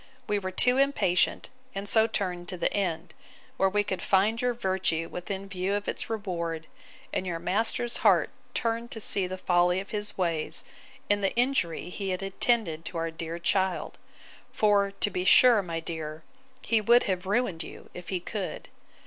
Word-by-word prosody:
We 205 -2 0
were 185 -1 -3
too 250 +7 +4
impatient, 275 -11 +2 0.3
and 195 +1 -4
so 220 +2 +4
turned 180 -5 -3
to 180 - -3
the - - 0
end; 175 -4 -2 0.4
where 195 - +3
we 205 +1 +1
find 195 +3 +1
your 250 -1 +1
virtue 190 -6 0
within 190 +3 -5
view 190 +1 -1
of 205 0 -3
its - - -3
reward, 170 -7 -3 0.5
and 185 - -1
your 170 -2 -2
master's 220 +7 0
heart - - +4 0.2
turned 230 0 -1
to 225 - -7
see 195 -3 0
the 185 +1 -5
folly 180 0 +2
of 195 - -8
his 210 -1 -2
ways, 165 -4 -1 0.4
and 205 0 +1
the 195 - +1
injury 235 -10 0
he 195 +1 -4
had 185 +1 -2
intended 195 -4 0
to 170 - -4
our 165 0 -1
dear 165 +1 -5
child: 190 +1 0 0.5
For, 205 -2 +3
to 200 +1 -1
be 180 - -1
sure, 235 +3 +7
my 165 -3 -4
dear, 160 -2 -6 0.4
he 225 -2 +2
would 235 +3 +5
have 185 -1 -2
ruined 200 -5 0
you, - - -10
if 180 -1 -9
he 185 - -1
could. 195 +2 -5
190 Hz, 175 wpm, -28 LUFS, 175-210 Hz, 0.5 s, sure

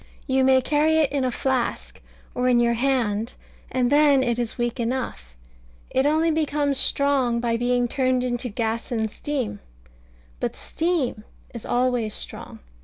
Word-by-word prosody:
You 265 -1 +2
may 260 0 +5
carry 305 +3 +2
it 305 -4 +2
in 280 -2 0
a 255 - +1
flask, 255 0 -2 0.3
or 250 0 +1
in 245 -1 +4
your 235 0 +3
hand, 235 -3 0 0.4
and 250 -1 +1
then 290 -2 +5
it 240 -1 0
is 235 -2 -2
weak 240 +1 -2
enough. 230 - -3 0.6
It 265 +2 +2
only 320 +2 +2
becomes 290 -3 0
strong 270 -5 +2
by 235 -1 0
being 245 +1 +1
turned 255 0 0
into 245 0 -2
gas 225 +2 -3
and 220 -2 -1
steam. 265 - -3 0.8
But - - -2
steam 320 -10 -2 0.3
is 235 -2 -8
always 245 -3 0
strong. - - -7
255 Hz, 155 wpm, -24 LUFS, 235-280 Hz, 0.8 s, may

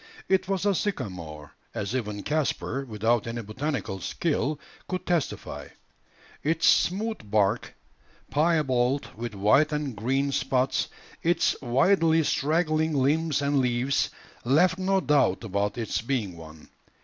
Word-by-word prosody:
It 190 -1 +2
was 195 0 -1
a 200 - +4
sycamore, 85 - -4 0.2
as 105 +5 -3
even 105 -5 -3
Caspar, 145 -2 -1
without 115 0 0
any 115 0 -4
botanical 125 -2 -3
skill, 150 - -1 0.3
could 185 0 -4
testify. 170 -5 -2 0.7
Its 160 +2 +1
smooth 205 - +2
bark, 105 +1 +1 0.6
piebald 140 -4 +1
with 115 -1 -5
white 110 +10 +4
and 150 -5 -2
green 135 +6 0
spots, 130 0 +1 0.3
its 170 0 +2
widely 160 +6 +3
straggling 155 +1 +1
limbs 145 +2 +1
and 140 0 +2
leaves, 125 +1 +1 0.3
left 180 +9 +3
no 190 +1 +2
doubt 140 - +2
about 100 +1 -1
its 115 -3 -2
being 115 -7 -2
one. 80 -1 -13
135 Hz, 125 wpm, -26 LUFS, 110-160 Hz, 0.7 s, a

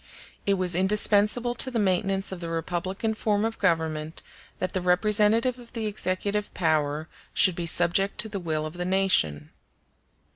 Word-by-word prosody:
It 200 - +3
was 185 -2 0
indispensable 210 +5 +3
to 250 +2 0
the 245 - -3
maintenance 195 -1 0
of 190 - -6
the 170 -1 -5
republican 180 +6 -2
form 215 -1 0
of 225 0 -4
government 160 -4 -1 0.3
that 185 - -3
the 185 - -1
representative 210 +7 +2
of 240 -1 -15
the 225 -2 -3
executive 205 0 -2
power 155 -2 0 0.3
should 185 -3 +4
be 170 -1 -4
subject 175 +4 +2
to 220 - -1
the 200 -2 -4
will 155 -3 -2
of 155 - -6
the 175 0 -4
nation. 180 - +1
190 Hz, 160 wpm, -26 LUFS, 170-210 Hz, 0.3 s, should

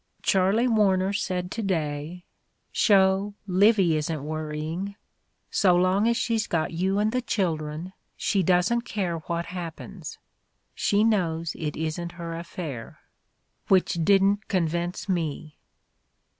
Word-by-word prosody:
Charley 195 +6 +3
War 210 -5 +3
ner 190 +2 0
said 180 -2 -2
to 225 - -3
day, 165 -2 -3 0.5
'Sho, 195 -1 +3
Livy 195 -2 +4
isn't 155 -1 -3
worrying. 155 +5 -4 0.6
So 185 -3 +4
long 185 +4 +3
as 235 0 +2
she's 225 -2 0
got 165 -1 -1
you 190 +4 0
and 210 +1 +2
the 255 +1 0
children 165 -5 -2 0.2
she 195 - +1
doesn't 185 +7 +2
care 190 -8 -2
what 170 +2 -3
happens. 175 0 -7 0.6
She 205 +1 +2
knows 170 -7 +1
it 150 -3 -4
isn't 160 +2 -3
her 170 -1 -6
affair.' 165 -8 -7 0.7
Which 190 -2 +3
didn't 200 +2 +3
convince 175 -1 -1
me!" 160 -4 -3
180 Hz, 125 wpm, -26 LUFS, 165-200 Hz, 0.7 s, Livy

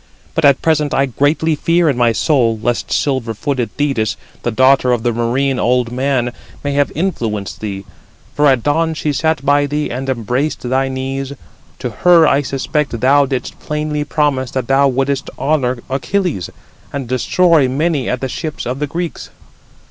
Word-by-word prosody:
But 165 - +1
at 140 -1 +4
present 150 -3 +1
I 135 - +3
greatly 145 +5 +1
fear 165 +3 +2
in 140 - +2
my 120 -1 +3
soul, 115 -3 +2
lest 120 +1 -2
silver 130 -5 0
footed 130 0 -2
Thetis, 135 -7 0 0.2
the - - -1
daughter 130 +2 +4
of 115 -2 -1
the 120 -1 +1
marine 125 +3 0
old 125 -1 +1
man, 130 -1 0 0.3
may 145 - -1
have 145 0 +1
influenced 115 - -2
thee: 100 -2 -5 0.5
for 150 0 +3
at 130 -4 +3
dawn 160 +2 +1
she 150 -1 -1
sat 160 -2 0
by 145 0 +3
thee 150 +1 -2
and 130 +2 -4
embraced 130 +4 -1
thy 135 +2 +1
knees: 135 +1 -4 0.4
to 125 - -4
her 170 +6 +5
I 140 0 +3
suspect 140 -1 -2
thou 140 +3 +4
didst 130 -1 -4
plainly 150 0 -2
promise 145 -4 0
that 130 -2 -3
thou 140 +1 +4
wouldest 135 +1 -1
honour 135 -4 0
Achilles, 140 - -1 0.4
and 140 -3 -4
destroy 145 +3 +3
many 145 -1 0
at 125 - -2
the 135 - -1
ships 155 +4 -5
of 125 +2 -3
the 150 - -1
Greeks." 170 +3 -5
135 Hz, 170 wpm, -17 LUFS, 125-150 Hz, 0.5 s, her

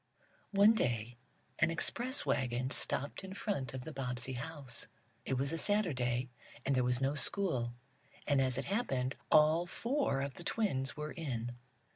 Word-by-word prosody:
One 205 +2 +6
day 120 - -1 0.4
an 170 - +4
express 240 +10 +1
wagon 130 -1 0
stopped 140 +6 0
in 190 0 -7
front 140 - -2
of 130 - -5
the 160 - -7
Bobbsey 125 -1 -3
house. 135 -1 -5 0.4
It 135 - 0
was 135 +4 0
a 165 - -1
Saturday, 130 - +1 0.3
and 140 - +2
there 125 - +3
was 125 0 +2
no 135 +1 +2
school, 140 -7 0 0.5
and, 140 -2 +3
as 130 -1 +1
it 135 - -2
happened, 135 - 0 0.2
all 155 +3 +5
four 235 - 0
of 140 0 -3
the 175 - -10
twins 155 -13 0
were 150 0 -4
in. 120 -7 -4
135 Hz, 160 wpm, -34 LUFS, 125-175 Hz, 0.5 s, One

